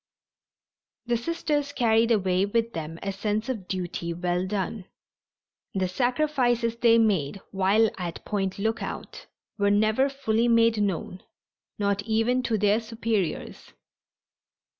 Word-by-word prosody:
The 240 0 +1
Sisters 290 +2 -1
carried 230 -2 +3
away 190 -4 +2
with 230 +2 0
them 160 0 -5
a 195 - -1
sense 210 +4 -2
of 215 -8 -4
duty 175 -2 -3
well 180 +1 -1
done. 195 0 -3 0.9
The 190 -1 +1
sacrifices 245 +1 +1
they 235 -1 +5
made 195 -7 +1
while 200 +3 +3
at 175 -2 -5
Point 195 -3 -2
Lookout 220 +3 -4 0.3
were 200 0 +3
never 215 +6 +3
fully 235 -4 0
made 230 -2 +4
known, 190 -2 -2 0.6
not 200 -1 0
even 225 +4 +1
to 230 -3 0
their 205 +1 +3
superiors. 225 -6 -3
215 Hz, 120 wpm, -26 LUFS, 190-230 Hz, 0.9 s, they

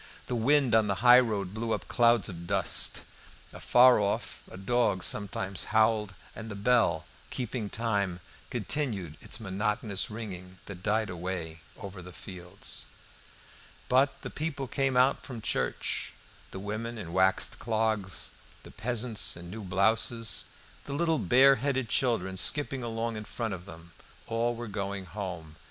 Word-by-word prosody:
The - - -4
wind 130 +2 +3
on 110 -1 +5
the 100 +3 -2
highroad 110 -6 +5
blew 115 +1 -2
up - - -4
clouds 120 -2 +4
of 85 -2 -8
dust. 95 -1 +3 0.5
Afar 125 -1 +6
off 100 -1 -2
a - - -9
dog 105 -1 +1
sometimes 95 -2 -2
howled; 110 -3 +2 0.2
and 115 0 -7
the 100 - -5
bell, 100 -6 +2 0.2
keeping 120 -4 -3
time, 100 -6 -1 0.3
continued 110 - -1
its - - -2
monotonous 105 0 -1
ringing 95 -4 -7
that 95 -3 -9
died 105 +1 0
away 85 -2 -5 0.2
over 95 -1 -8
the 90 +1 -10
fields. 90 -1 -6 1.0
But 135 +2 +2
the - - -5
people 150 -3 -3
came 135 0 0
out 130 +2 +4
from 125 -5 -7
church. - - -2 0.4
The - - -8
women 110 +4 -4
in 90 -6 -7
waxed 95 +1 +2
clogs, 110 -5 -1 0.3
the - - -12
peasants 120 -3 -1
in 85 0 -9
new 110 +2 -6
blouses, 110 +4 +2 0.4
the 140 - -5
little 165 +1 +1
bare 135 +2 +6
headed 130 -2 -1
children 95 -8 0
skipping 140 +3 +1
along 115 -1 -3
in 105 - -6
front 115 -2 -3
of 90 +1 -8
them, 85 -1 -12 0.3
all 115 +1 0
were 120 0 -6
going 100 -1 -4
home. 90 -6 -7
110 Hz, 145 wpm, -29 LUFS, 95-120 Hz, 1.0 s, Afar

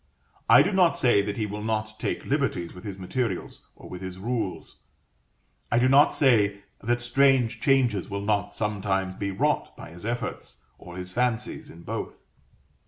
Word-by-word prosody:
I - - +8
do - - 0
not 185 -3 +3
say 120 -8 +4
that 100 0 -4
he 110 - 0
will 105 0 -5
not 110 0 -3
take - - -3
liberties 85 -1 -1
with 90 - -12
his 100 -3 -6
materials, 95 +1 -4
or - - -13
with 90 - -8
his 95 -1 -6
rules: 105 -5 -4 0.9
I 120 - +3
do 125 +2 +4
not 140 +3 +6
say 105 -7 +3 0.2
that 120 +2 0
strange 125 -1 +3
changes 125 - +2
will 100 0 -4
not 105 -1 0
sometimes 95 -3 -1
be 100 +1 -3
wrought 95 - -1
by - - -10
his 85 +1 -12
efforts, 120 +2 -5 0.2
or 90 0 -10
his 90 0 -6
fancies, 120 +1 -1
in 85 +1 -13
both. - - -6
105 Hz, 170 wpm, -26 LUFS, 95-120 Hz, 0.9 s, I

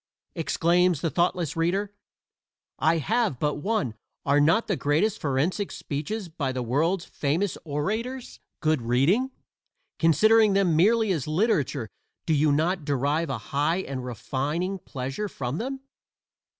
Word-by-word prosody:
exclaims 170 +1 +2
the 165 - -1
thoughtless 175 -2 0
reader 190 +5 0 0.9
I 160 +3 +3
have 215 - 0
but 150 -1 0
one 150 - -1 0.3
"are 145 +1 +4
not 165 +10 +3
the 200 - 0
great 160 +9 +1
forensic 160 +5 -1
speeches 175 +8 -4
by 150 -5 -3
the 130 -1 -3
world's 165 +9 0
famous 165 +7 -1
orators 220 - -3 0.2
good 155 -4 +2
reading? 140 - +2 0.7
Considering 215 +6 +5
them 190 -5 +3
merely 215 +5 +4
as 155 -7 -1
literature 155 - +1 0.4
do 160 - +1
you 150 0 +3
not 160 +4 +1
derive 145 +3 0
a 135 - -1 0.2
high 150 +5 +2
and 135 -7 -5
refining 145 - -3
pleasure 135 +8 -5
from 130 0 -4
them?" 265 +3 -4
165 Hz, 135 wpm, -26 LUFS, 145-195 Hz, 0.9 s, Considering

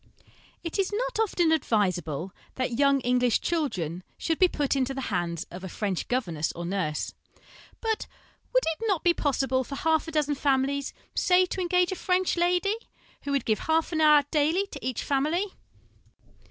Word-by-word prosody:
It 335 +3 -4
is 385 0 +1
not - - -2
often 350 -6 +2
advisable 185 - 0 0.2
that 255 -2 -2
young 280 -1 +4
English 250 -1 +2
children 185 - -2 0.2
should 325 -1 -1
be 370 - +7
put 290 -5 -1
into 270 0 0
the 265 -5 -4
hands 170 -2 -1
of 180 +2 -8
a 190 - -5
French 195 -1 -2
governess 170 -12 -1
or 175 - -6
nurse; 170 -5 -2 0.7
but 445 -1 -1 0.4
would - - +3
it 325 +6 -2
not 385 -6 +1
be 345 - +5
possible 270 -4 0
for 275 - -7
half 320 +3 +1
a - - -5
dozen 300 -2 +1
families, 275 0 0 0.2
say, 365 0 +4
to 370 - -4
engage 360 0 +2
a - - -2
French 365 0 +1
lady, 360 +4 +2 0.5
who 285 - -2
would 280 -3 0
give 215 -2 +1
half 320 +1 +1
an 315 -2 0
hour 300 -1 +7
daily 320 +6 +2
to - - -8
each 255 -2 -2
family 315 +8 0
285 Hz, 175 wpm, -27 LUFS, 235-345 Hz, 0.7 s, be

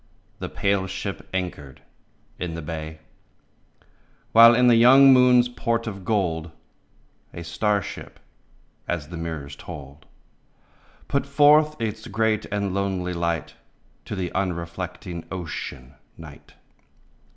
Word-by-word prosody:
The - - -5
pale 100 -1 0
ship 95 +1 -6
anchored 85 -8 -5 0.6
in 85 -2 -4
the 85 - -6
bay, 80 0 -6 1.3
While 115 +1 +8
in 125 +1 +4
the 120 -1 +6
young 135 +4 +7
moon's 125 -1 +5
port 115 -1 -2
of 100 -4 -6
gold 85 -5 -1 0.9
A 85 - -6
star 100 +5 0
ship - - -9 0.3
— - - -33 0.3
as 80 -4 -3
the 85 - -8
mirrors 80 -4 -6
told 75 -3 -11 0.5
— - - -32
Put 140 0 -1
forth 150 +2 +4
its 110 -1 -4
great 110 +1 0
and 100 -2 -2
lonely 95 -2 -2
light 85 -1 -2 0.5
To - - -5
the 90 -3 -3
unreflecting 85 -1 -4
Ocean, 75 -7 -6 0.2
Night. 75 -3 -14
95 Hz, 125 wpm, -24 LUFS, 85-115 Hz, 1.3 s, While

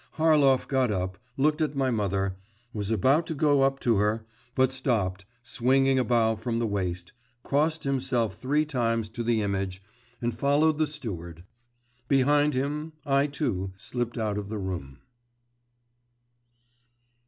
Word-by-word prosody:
Harlov 150 -5 +4
got 130 -4 +1
up, 95 -1 -3 0.2
looked 150 +3 +2
at 150 -2 0
my 135 -2 +1
mother, 100 -3 -1 0.4
was 105 -2 -3
about 130 - +2
to 160 - -3
go 145 -1 +3
up 135 0 +2
to 115 -4 +2
her, 105 +2 0 0.3
but 130 -1 +3
stopped, 105 -8 -1 0.2
swinging 130 +2 +2
a - - +3
bow 115 -2 +2
from 115 +2 -3
the 115 - 0
waist, 90 -4 -3 0.3
crossed 155 +3 0
himself 130 -4 0
three 150 +4 0
times 115 -6 -1
to 120 +2 -6
the 115 -2 +1
image, 95 -2 -2 0.4
and 120 0 -1
followed 145 +6 +2
the 155 - +3
steward. 85 - -5 0.6
Behind 145 +2 +3
him, 150 +4 -2
I, 140 +1 +3
too, 110 - -2
slipped 120 +3 -4
out 105 -2 -1
of 100 -1 -7
the 110 - -3
room. 85 -9 -5
120 Hz, 145 wpm, -27 LUFS, 105-140 Hz, 0.6 s, Harlov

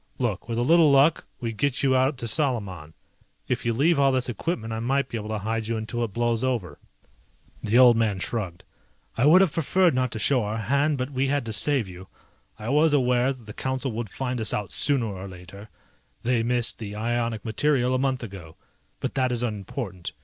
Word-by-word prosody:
Look, 115 -4 -2
with 115 - -2
a 120 - +1
little 165 +3 +5
luck 140 +4 +4
we 115 -3 -3
get 140 +6 -1
you 130 -1 +3
out 130 +2 +2
to 120 - -4
Salaman. 105 - -2 0.5
If 125 -1 -2
you - - +3
leave 150 +6 +3
all 135 -1 +4
this 130 -1 +1
equipment 115 -3 -3
I 110 - -3
might 135 +4 0
be - - -5
able 105 -1 -5
to 110 - -2
hide 110 +2 -2
you 115 0 -1
until 115 +2 -3
it 115 - -3
blows 120 +2 0
over." 120 -9 -2 0.8
The 110 +3 +1
old 125 -2 +8
man 110 -3 +1
shrugged. 95 -3 -4 0.5
"I 125 +5 +3
would 180 +5 +7
have 185 -6 +2
preferred 175 +2 +2
not 130 0 +1
to - - -4
show 125 +4 +2
our 105 +1 -3
hand, 140 +7 +1
but 130 +2 -3
we 135 0 0
had 140 -2 0
to 110 - -3
save 135 -1 +1
you. 90 0 -11 0.5
I 110 - -6
was 150 +3 +3
aware 125 -1 +3
that 130 -4 -10
the 105 - -9
Council 130 +1 -2
would 115 -1 -4
find 125 +2 -3
us 110 - 0
out 105 -2 -4
sooner 140 -5 +1
or 100 -2 -6
later, 95 +3 -11 0.5
they 120 -1 +1
missed 120 0 0
the 105 -2 -6
ionic 115 0 -2
material 125 +2 +1
a 130 - +1
month 130 -1 0
ago. 95 -7 -9 0.5
But - - -2
that 130 -2 +1
is 120 -1 -1
unimportant. 100 -4 -5
120 Hz, 215 wpm, -25 LUFS, 110-135 Hz, 0.8 s, old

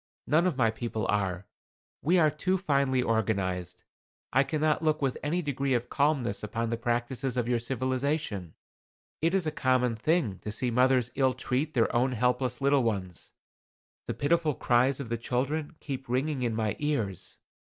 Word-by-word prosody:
"None 165 +6 +3
of 165 -7 -1
my 115 -4 +3
people 110 -2 -3
are. 95 -2 0 0.6
We 175 +5 +3
are 155 -3 +4
too 185 +5 0
finely 140 -7 +1
organized. 95 -6 -1 0.5
I 135 - +5
cannot 155 +2 0
look 155 -1 +1
with 135 -3 0
any 170 +5 -1
degree 140 -2 0
of 120 0 -2
calmness 140 -7 +1
upon 115 +2 -2
the 115 - 0
practices 120 +2 -1
of 120 -2 0
your 120 -1 +1
civilization. 130 - -2 0.7
It 165 +4 +2
is 190 -3 +1
a 155 - 0
common 125 -3 +1
thing 125 - 0
to 105 - -5
see 120 +3 -1
mothers 125 0 +3
ill 130 -2 +2
treat 135 +4 -2
their 115 0 +2
own 125 +2 +2
helpless 125 +2 0
little 140 0 +4
ones. 95 -7 -3 0.7
The - - -2
pitiful 155 0 +1
cries 125 +3 +2
of 135 -5 -5
the 115 - -1
children 145 +7 -2
keep 135 -3 -6
ringing 135 +2 0
in 120 -3 0
my 110 -2 -1
ears. 115 - -2
130 Hz, 170 wpm, -29 LUFS, 115-145 Hz, 0.7 s, I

